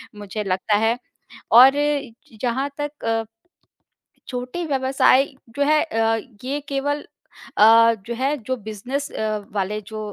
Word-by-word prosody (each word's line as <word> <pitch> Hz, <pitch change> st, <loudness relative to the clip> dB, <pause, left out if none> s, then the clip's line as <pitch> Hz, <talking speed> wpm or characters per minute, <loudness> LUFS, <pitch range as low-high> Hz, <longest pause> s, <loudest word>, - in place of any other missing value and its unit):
मुझे 210 Hz, +1 st, -5 dB
लगता 195 Hz, +2 st, 0 dB
है। 230 Hz, +2 st, +2 dB, 0.5 s
और 260 Hz, +4 st, +8 dB
इ 290 Hz, -4 st, -1 dB, 0.3 s
जहाँ 260 Hz, +3 st, -1 dB
तक 290 Hz, 0 st, -5 dB
अ 225 Hz, 0 st, 0 dB, 1.0 s
छोटे 250 Hz, +7 st, -4 dB
व्यवसाय 270 Hz, -1 st, +3 dB, 0.3 s
जो 285 Hz, -, +3 dB
हैं 305 Hz, +1 st, +3 dB
अ, 225 Hz, -5 st, +1 dB, 0.3 s
ये 275 Hz, +3 st, -2 dB
केवल 285 Hz, +1 st, -2 dB, 0.5 s
अ, 230 Hz, +2 st, +7 dB
जो 235 Hz, -, -3 dB
है 270 Hz, +5 st, 0 dB
जो 260 Hz, -, 0 dB
बिज़नेस 230 Hz, +6 st, -5 dB
अ, 215 Hz, -1 st, -2 dB, 0.2 s
वाले 210 Hz, +1 st, -2 dB
जो 220 Hz, -1 st, -7 dB
250 Hz, 135 wpm, -22 LUFS, 220-280 Hz, 1.0 s, और